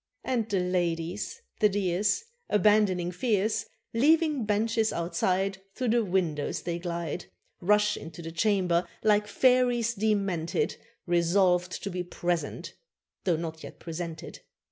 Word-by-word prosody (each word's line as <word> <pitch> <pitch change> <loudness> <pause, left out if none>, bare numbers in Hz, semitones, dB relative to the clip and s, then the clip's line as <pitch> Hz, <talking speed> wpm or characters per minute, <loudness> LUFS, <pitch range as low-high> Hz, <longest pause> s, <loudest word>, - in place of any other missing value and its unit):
And 230 -4 -1
the 200 -3 +1
ladies, 180 - -2 0.2
the 210 - +5
dears, 200 - +1 0.3
Abandoning 205 -4 +3
fears, 210 +2 0 0.3
Leaving 300 +1 +3
benches 220 +1 +1
outside 185 +3 0
Through 255 -2 -1
the 235 +1 +3
windows 175 -7 -1
they 170 -1 -2
glide, 170 -1 -4 0.4
Rush 210 +3 +3
into 165 +2 -9
the 165 - -6
chamber 180 -2 +1 0.2
like 210 -1 +3
fairies 245 -1 +3
demented, 195 -6 0 0.3
Resolved 180 +1 +2
to 200 - -3
be 180 0 -2
present 175 -3 -3 0.5
though 180 -3 +3
not 160 -1 -5
yet - - -10
presented. 165 -1 -6
190 Hz, 120 wpm, -28 LUFS, 170-215 Hz, 0.5 s, the